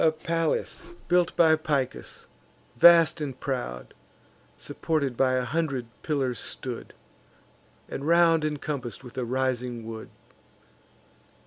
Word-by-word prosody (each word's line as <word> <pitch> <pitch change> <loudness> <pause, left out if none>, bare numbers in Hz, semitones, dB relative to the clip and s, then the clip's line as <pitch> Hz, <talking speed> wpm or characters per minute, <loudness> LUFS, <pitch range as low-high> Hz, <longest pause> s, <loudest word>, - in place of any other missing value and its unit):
The 160 - +5
palace 165 +1 -2 0.3
built 180 0 +2
by 160 -2 +5
Picus, 145 -5 -3 0.5
vast 165 +3 +6
and 135 -4 -4
proud, 120 - -4 0.6
Supported 145 -6 -2
by 130 +1 +2
a 130 -1 0
hundred 140 -3 -1 0.2
pillars 135 -6 -1
stood, - - -5 0.9
And 140 - -5
round 165 -1 +5
incompass'd 145 -5 -4
with 125 - -12
a 125 - -1
rising 125 -2 -2
wood. 110 -1 -7
140 Hz, 110 wpm, -26 LUFS, 125-160 Hz, 0.9 s, vast